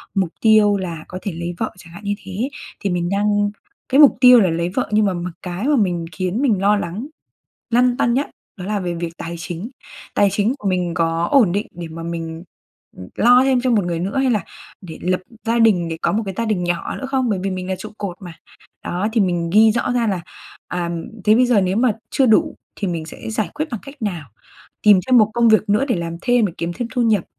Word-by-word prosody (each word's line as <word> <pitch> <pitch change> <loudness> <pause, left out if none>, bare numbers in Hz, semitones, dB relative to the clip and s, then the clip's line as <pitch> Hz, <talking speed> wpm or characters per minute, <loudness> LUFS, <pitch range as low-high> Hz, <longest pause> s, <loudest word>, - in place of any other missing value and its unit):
mục 190 -3 +1
tiêu 215 -2 +5
là 170 -5 -5
có 185 - -7
thể 200 - -3
lấy 170 +1 -5
vợ, 220 - -2
chẳng 165 -2 -14
hạn 200 - -11
như 205 0 -1
thế, 195 +8 -3 0.3
thì 200 - -1
mình 175 -1 -1
đang 205 +1 +1 0.4
cái 270 - +3
mục 290 - +7
tiêu 250 -1 +9
là 190 - +3
lấy 170 +1 -1
vợ 180 - -2
nhưng 215 0 +3
mà 195 - +1
mặc 175 0 -4
cái 180 +7 -4
mà 295 - +3
mình 175 -6 0
khiến 185 +6 -2
mình 225 -9 +2
lo 205 +1 +4
lắng, 200 +7 -4 0.6
lăn 245 +1 +3
tăn 235 -2 +1
nhất 275 +3 -1 0.3
đó 180 - -6
là 210 0 -1
về 175 -2 -3
việc 170 0 -4
tài 170 +1 -5
chính. 175 +6 -6 0.4
Tài 205 - +4
chính 215 +5 +1
của 205 - -2
mình 180 -2 -1
có 165 0 0
ổn 235 -11 +4
định 205 +3 -1
để 170 -1 -7
mà 165 +1 -8
mình 165 0 -5 0.7
lo 245 +2 +5
thêm 265 -2 +2
cho 255 - +1
một 215 -5 +2
người 170 -1 -2
nữa 195 +8 -2
hay 265 -1 +2
là 215 -4 0 0.4
để 165 -4 -9
lập 185 0 0 0.2
gia 230 +1 +1
đình 200 -7 +3
để 165 - -4
có - - +1
một 220 - 0
cái 195 - -4
gia 230 - 0
đình 200 -5 0
nhỏ 175 -1 -2
nữa 265 - -5
không? 265 -2 0
Bởi 200 - 0
vì 195 - -1
mình 185 0 -4
là 190 - -1
trụ - - -8
cột 195 -4 -4
mà. 175 -2 -8 0.5
Đó, 185 +4 -1
thì 230 - +2
mình 175 -3 0
ghi 215 +2 +6
rõ 245 +2 -1
ra 240 -2 +1
là, 195 -4 -1 0.5
à, 175 -1 -2 0.3
thế 215 - +5
bây 250 +2 +4
giờ 240 -4 +4
nếu 185 +1 0
mà 240 0 +3 0.2
chưa 270 - +2
đủ 220 -2 +3 0.2
thì 200 - -2
mình 165 -2 -3
sẽ 195 - -8
giải 220 -1 -1
quyết 305 +2 -3
bằng 230 -5 -4
cách 275 0 -10
nào? 170 - -4 0.5
Tìm 205 -3 +6
cho 260 - -2
một 215 -2 +5
công 235 -1 +4
việc 220 -1 +3
nữa 210 +6 +3
để 245 - +1
làm 170 -1 -4
thêm 245 -3 +3
để 185 - -6
kiếm 170 +1 -2
thêm 235 +6 -4
thu 250 - +2
nhập, 215 -6 +2
200 Hz, 250 wpm, -20 LUFS, 175-230 Hz, 0.7 s, tiêu